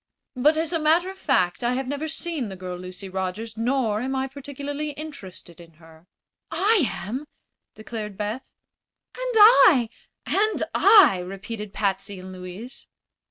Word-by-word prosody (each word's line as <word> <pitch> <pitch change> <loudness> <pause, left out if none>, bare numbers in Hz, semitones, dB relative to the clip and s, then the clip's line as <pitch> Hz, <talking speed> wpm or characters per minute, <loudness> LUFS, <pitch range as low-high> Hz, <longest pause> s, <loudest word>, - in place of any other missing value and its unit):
But, 300 +5 +3
as 325 +1 -1
a 330 - +1
matter 330 +4 +2
of 385 - -13
fact, 185 - +1
I 240 +1 +1
have 260 +1 -2
never 285 +3 -3
seen 320 -6 -3
the 190 - -7
girl 180 -1 -6
Lucy 180 +2 -8
Rogers, 190 +4 -4
nor 230 -2 0
am 265 +2 -2
I 265 0 0
particularly 285 +2 -6
interested 200 - -10
in 165 -1 -16
her." 160 +1 -19 0.4
"I 380 +1 +3
am," 255 +9 -5 0.5
declared 215 -2 -7
Beth. 210 +5 -4 0.6
"And - - -4
I!" 380 - +7 0.4
"And 430 +2 +1
I!" 400 - +6
repeated 195 +3 -7
Patsy 195 -1 -2
and 185 0 -9
Louise. 185 +7 -9
240 Hz, 150 wpm, -24 LUFS, 190-305 Hz, 0.6 s, I